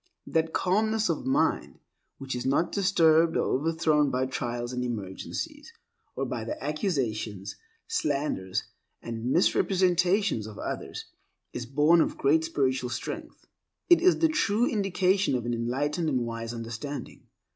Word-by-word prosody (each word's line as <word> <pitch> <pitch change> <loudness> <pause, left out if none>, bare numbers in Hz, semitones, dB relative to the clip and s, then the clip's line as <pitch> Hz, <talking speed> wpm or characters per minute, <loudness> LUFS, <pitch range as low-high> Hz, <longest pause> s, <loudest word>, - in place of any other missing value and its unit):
That 160 0 0
calmness 215 +4 +1
of 155 -5 -2
mind, 130 - +1 0.4
which 135 -2 -5
is 125 - -3
not 145 +6 +1
disturbed 165 -4 +4
or - - 0
overthrown 155 -2 +2
by 130 0 0
trials 120 -1 -3
and 125 0 -2
emergencies, 125 - -5 0.4
or - - -1
by - - -4
the 305 +1 -5
accusations, 120 - -2 0.3
slanders, 140 - -1 0.4
and 115 +1 -4
misrepresentations 180 - +2
of 110 - -10
others, - - -5 0.5
is 120 -1 -5
born 150 +6 +4
of - - -1
great 155 +4 +3
spiritual 130 -6 0
strength. 120 - -6 0.5
It 345 - +8
is 370 +1 +5
the 325 - +4
true 240 -7 +1
indication 195 - +1
of 120 -2 -2
an 120 - -1
enlightened 145 +8 -1
and 130 -4 +1
wise 115 0 -5
understanding. 120 +5 -7
150 Hz, 135 wpm, -27 LUFS, 120-185 Hz, 0.5 s, It